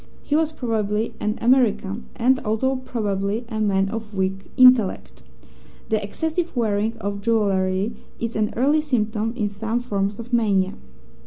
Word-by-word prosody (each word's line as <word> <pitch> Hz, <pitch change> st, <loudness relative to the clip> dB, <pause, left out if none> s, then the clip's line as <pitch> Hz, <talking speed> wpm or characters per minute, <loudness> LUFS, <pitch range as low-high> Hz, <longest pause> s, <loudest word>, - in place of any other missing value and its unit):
He 295 Hz, -, 0 dB
was 315 Hz, 0 st, +2 dB
probably 220 Hz, -5 st, -1 dB
an 210 Hz, +1 st, -1 dB
American, 230 Hz, -4 st, +2 dB
and 260 Hz, +2 st, +3 dB
also 225 Hz, +5 st, 0 dB
probably 210 Hz, -3 st, -2 dB
a 220 Hz, -2 st, -3 dB
man 195 Hz, -2 st, +2 dB
of 220 Hz, -1 st, -6 dB
weak 190 Hz, 0 st, -2 dB
intellect. 255 Hz, -6 st, +4 dB, 0.7 s
The 215 Hz, -1 st, +1 dB
excessive 320 Hz, -, -2 dB
wearing 220 Hz, 0 st, 0 dB
of 200 Hz, -2 st, -4 dB
jewellery 200 Hz, -2 st, +1 dB, 0.3 s
is 230 Hz, 0 st, -3 dB
an 215 Hz, -1 st, 0 dB
early 290 Hz, +5 st, +3 dB
symptom 225 Hz, -6 st, -1 dB
in 210 Hz, -, 0 dB
some 220 Hz, +3 st, -2 dB
forms 200 Hz, -4 st, -2 dB
of 235 Hz, +2 st, -9 dB
mania. 200 Hz, -5 st, +2 dB
220 Hz, 145 wpm, -23 LUFS, 200-240 Hz, 0.7 s, intellect